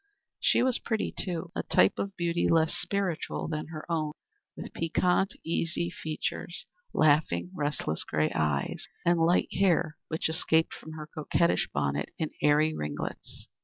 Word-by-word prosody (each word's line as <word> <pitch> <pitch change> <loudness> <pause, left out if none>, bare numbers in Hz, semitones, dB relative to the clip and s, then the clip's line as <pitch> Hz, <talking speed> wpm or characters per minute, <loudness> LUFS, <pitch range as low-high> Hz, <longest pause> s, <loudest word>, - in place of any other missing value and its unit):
She - - +4
was 255 -1 +2
pretty, 220 -2 -1
too 170 -3 -3
a - - 0
type - - +3
of 195 0 -3
beauty 170 0 +1
less 160 -1 +4
spiritual 195 -5 -1
than 155 -1 -3
her 155 -1 -7
own 155 -3 -1 0.4
with - - -7
piquant, 180 +4 +1
eager 170 +1 -1
features, 155 +2 -4 0.3
laughing, 145 - +3
restless 145 - -1
gray 75 0 0
eyes, 75 -3 -1 0.2
and 170 0 +4
light 165 +2 +3
hair 170 -4 +2
which 160 - -1
escaped 160 0 +2
from 160 - -9
her 155 -1 -6
coquettish 155 +2 +1
bonnet 70 +1 -1
in 155 - -2
airy 150 +1 +4
ringlets. 75 -1 -5
160 Hz, 145 wpm, -29 LUFS, 150-170 Hz, 0.4 s, She